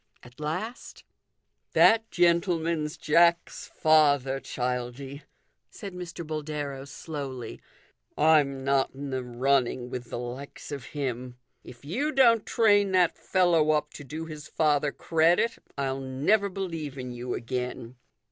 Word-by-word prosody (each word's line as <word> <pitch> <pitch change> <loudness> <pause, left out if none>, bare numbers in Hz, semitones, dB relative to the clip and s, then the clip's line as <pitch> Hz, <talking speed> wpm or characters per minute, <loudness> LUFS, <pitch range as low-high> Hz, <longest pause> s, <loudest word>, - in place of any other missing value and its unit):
At 125 +3 -16
last 180 - -5 0.3
" - - -47
That 225 0 +5
gentleman's 170 -3 +1
Jack's 170 +2 +2
father, 145 -4 +3
Childie," 125 +3 -4 0.5
said 200 -4 -9
Mr. 175 -1 -7
Boldero 150 -3 -4
slowly. 140 -3 -7 0.3
" - - -42 0.2
I'm 145 -3 +3
not 135 -1 +1
in 140 0 -6
the 130 -1 -2
running 125 0 0
with 125 -1 -6
the - - -4
likes 125 +5 -7
of 140 -2 -6
him. 125 -4 -4 0.3
If 120 +2 -13
you 270 - -1
don't 235 -6 +4
train 205 -4 +3
that 180 -2 +3
fellow 175 -5 +2
up 150 0 -1
to 145 - -9
do 155 +4 -6
his 155 -2 -9
father 150 -2 +1
credit, 170 +10 +2 0.2
I'll 135 -1 -1
never 150 +11 +1
believe 165 -7 -5
in 125 -1 -5
you 120 0 -4
again." 125 0 -4
150 Hz, 135 wpm, -27 LUFS, 130-170 Hz, 0.5 s, That